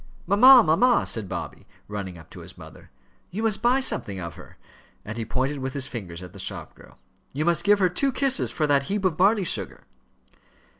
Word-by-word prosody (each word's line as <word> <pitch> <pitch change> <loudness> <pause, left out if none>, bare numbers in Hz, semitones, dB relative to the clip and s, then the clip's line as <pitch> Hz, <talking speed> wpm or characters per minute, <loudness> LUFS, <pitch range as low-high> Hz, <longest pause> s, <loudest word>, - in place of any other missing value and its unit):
"Mamma, 245 +6 +7
mamma," 240 +11 +3
said 105 -5 -4
Bobby, - - -7 0.2
running 100 -4 -6
up 80 - -16
to - - -11
his - - -13
mother, - - -14 0.4
"you 215 +5 -5
must 215 -2 +1
buy 245 +3 +3
something 100 - -3
of 85 -2 -6
her," 90 +1 -15 0.5
and 105 - -6
he 115 - -4
pointed 130 +5 -2
with 130 0 -4
his 140 -2 -2
fingers 95 -9 -8
at 90 - -11
the - - -12
shop - - -4
girl. - - -19 0.4
"You 150 +3 -2
must 170 -2 +1
give 205 0 +4
her 190 -2 +3
two 270 +10 0
kisses 270 +1 +1
for 155 - -1
that 140 -2 +2
heap 200 +2 -3
of 180 -4 +1
barley 195 +3 +2
sugar." - - -3
155 Hz, 205 wpm, -24 LUFS, -, 0.5 s, Mamma